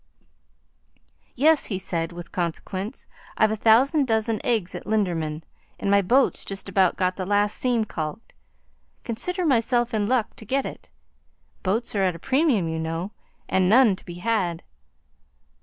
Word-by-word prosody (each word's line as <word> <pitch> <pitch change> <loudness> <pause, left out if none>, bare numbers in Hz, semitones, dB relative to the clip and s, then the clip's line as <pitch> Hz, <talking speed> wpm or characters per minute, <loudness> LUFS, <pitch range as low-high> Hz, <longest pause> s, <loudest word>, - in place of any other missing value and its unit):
"Yes," 305 +4 +4
he 195 - -2
said 170 -3 -3
with 175 0 -9
consequence. 185 +6 -4 0.3
"I've 215 -1 +4
a - - 0
thousand 260 +7 +4
dozen 225 -1 0
eggs 215 -7 0
at - - -8
Linderman, 165 -7 -1 0.4
and 200 - 0
my 200 0 +5
boat's 255 +8 +2
just 195 0 -6
about 190 -2 +2
got 185 -1 0
the 185 - -3
last 205 +1 +2
seam 240 -3 +1
caulked. 155 +2 -6 0.7
Consider 345 +10 -2
myself 240 -3 +2
in 210 -2 +1
luck 245 -2 0
to - - -8
get 270 +5 0
it. - - -8 0.7
Boats 215 +6 -1
are 200 - 0
at 185 -3 +1
a - - -9
premium, 260 - +2
you 160 0 -3
know, 165 +4 -3 0.4
and 185 -1 +2
none 230 -2 +6
to - - -14
be 175 - -9
had." 180 -4 -1
205 Hz, 155 wpm, -24 LUFS, 180-235 Hz, 0.7 s, none